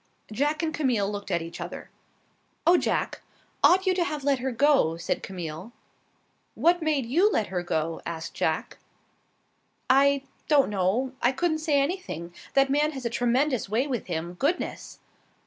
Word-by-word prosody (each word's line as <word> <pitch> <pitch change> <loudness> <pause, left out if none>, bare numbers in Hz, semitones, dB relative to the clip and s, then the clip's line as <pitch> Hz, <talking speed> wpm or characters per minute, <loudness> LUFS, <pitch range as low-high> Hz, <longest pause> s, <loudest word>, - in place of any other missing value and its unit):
Jack 295 +8 0
and 315 -1 -1
Camille 235 -9 0
looked 205 -1 -6
at 170 -3 0
each 165 - -8
other. - - -7 0.7
"Oh, 345 +2 +6
Jack, - - 0 0.4
ought 375 +2 +6
you 375 - +3
to 360 -1 +1
have 300 -4 -4
let 280 -2 +2
her 260 +1 -2
go?" 255 - +3
said 170 - -2
Camille. 180 +3 -7 0.8
"What 350 +1 +3
made 300 -5 +1
you 350 - +3
let 220 - +1
her 180 -1 -2
go?" 165 -1 -2
asked 165 -1 -6
Jack. - - -2 1.1
"I 280 +1 +4 0.2
don't 280 -7 +4
know. 205 +7 0
I 245 - +4
couldn't 315 +4 0
say 305 -3 +2
anything. 275 - -3 0.2
That 275 0 +4
man 300 +2 +2
has 265 -3 -7
a 235 - -1
tremendous 245 -1 +1
way 230 +6 +1
with 255 -6 -3
him. 170 0 -3
Goodness!" 285 - -2
265 Hz, 165 wpm, -26 LUFS, 195-300 Hz, 1.1 s, Oh